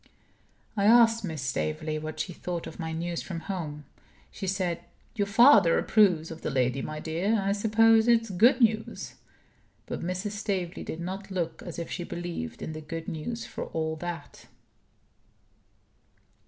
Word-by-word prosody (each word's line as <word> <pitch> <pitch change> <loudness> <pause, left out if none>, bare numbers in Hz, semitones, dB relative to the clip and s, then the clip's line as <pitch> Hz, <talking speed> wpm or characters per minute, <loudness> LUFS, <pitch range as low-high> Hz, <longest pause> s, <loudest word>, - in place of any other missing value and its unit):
I 200 -2 +1
asked 230 0 +6
Mrs. 160 -5 -4
Staveley 155 +4 -2
what 155 0 -6
she 180 - -3
thought 175 0 -4
of 160 - -9
my 160 -1 -3
news 170 +1 -3
from 170 -3 -6
home. 155 -5 -5 0.5
She 195 - -6
said: 180 -3 -1 0.3
"Your 205 -3 0
father 220 -5 +6
approves 180 -8 +3
of 165 - -8
the - - -2
lady, 130 -1 +1
my 155 0 -5
dear. 180 +8 0
I 195 0 0
suppose 220 +2 +4
it's 230 -2 +3
good 230 +9 +5
news." 220 -1 +1 0.7
But - - -5
Mrs. 185 +4 -3
Staveley 195 -4 -3
did 160 - -6
not 190 +3 -5
look 180 -4 -3
as 175 - -7
if 170 - -5
she 175 - -3
believed 170 - -5
in 160 - -4
the 155 - -6
good 165 +1 -6
news, 230 +10 -4
for - - -5
all 160 0 -2
that. 175 +1 -7
175 Hz, 160 wpm, -28 LUFS, 160-205 Hz, 0.7 s, asked